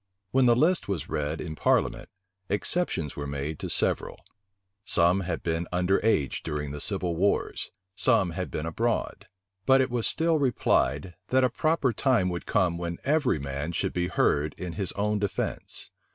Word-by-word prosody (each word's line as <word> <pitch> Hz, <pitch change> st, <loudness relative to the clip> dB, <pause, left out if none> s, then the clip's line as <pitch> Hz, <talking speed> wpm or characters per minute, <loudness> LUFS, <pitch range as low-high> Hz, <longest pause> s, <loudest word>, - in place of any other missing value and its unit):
When 130 Hz, -1 st, +4 dB
the 120 Hz, -, +6 dB
list 170 Hz, +8 st, +2 dB
was 95 Hz, -6 st, -3 dB
read 75 Hz, +2 st, -2 dB
in 80 Hz, -3 st, -5 dB
parliament, -, -, +1 dB, 0.4 s
exceptions 105 Hz, -, 0 dB
were 70 Hz, 0 st, -4 dB
made 70 Hz, +2 st, -4 dB
to -, -, -4 dB
several: -, -, -1 dB, 0.6 s
some 90 Hz, 0 st, +3 dB
had 85 Hz, -3 st, -3 dB
been 85 Hz, 0 st, -1 dB
under 90 Hz, +3 st, +1 dB
age 75 Hz, -, +1 dB
during 75 Hz, -2 st, -4 dB
the 75 Hz, 0 st, -5 dB
civil 95 Hz, -5 st, +1 dB
wars; 100 Hz, +5 st, 0 dB, 0.2 s
some 105 Hz, -3 st, +3 dB
had 90 Hz, +2 st, -4 dB
been 75 Hz, -, -4 dB
abroad. 115 Hz, +8 st, -2 dB, 0.4 s
But 135 Hz, 0 st, +6 dB
it 130 Hz, -1 st, +1 dB
was 120 Hz, -2 st, 0 dB
still 165 Hz, -1 st, +1 dB
replied, 90 Hz, -, +1 dB
that 130 Hz, 0 st, +3 dB
a 125 Hz, -, +3 dB
proper 155 Hz, -3 st, +1 dB
time 120 Hz, -6 st, +2 dB
would 85 Hz, -1 st, -5 dB
come 90 Hz, -4 st, +1 dB
when 85 Hz, 0 st, -3 dB
every 140 Hz, -, +2 dB
man 70 Hz, +3 st, -4 dB
should -, -, -1 dB
be 90 Hz, -1 st, 0 dB
heard 75 Hz, -4 st, +1 dB
in 90 Hz, -2 st, -5 dB
his 95 Hz, -2 st, -2 dB
own 105 Hz, +1 st, 0 dB
defence. 100 Hz, -1 st, -3 dB
90 Hz, 170 wpm, -27 LUFS, 80-120 Hz, 0.6 s, the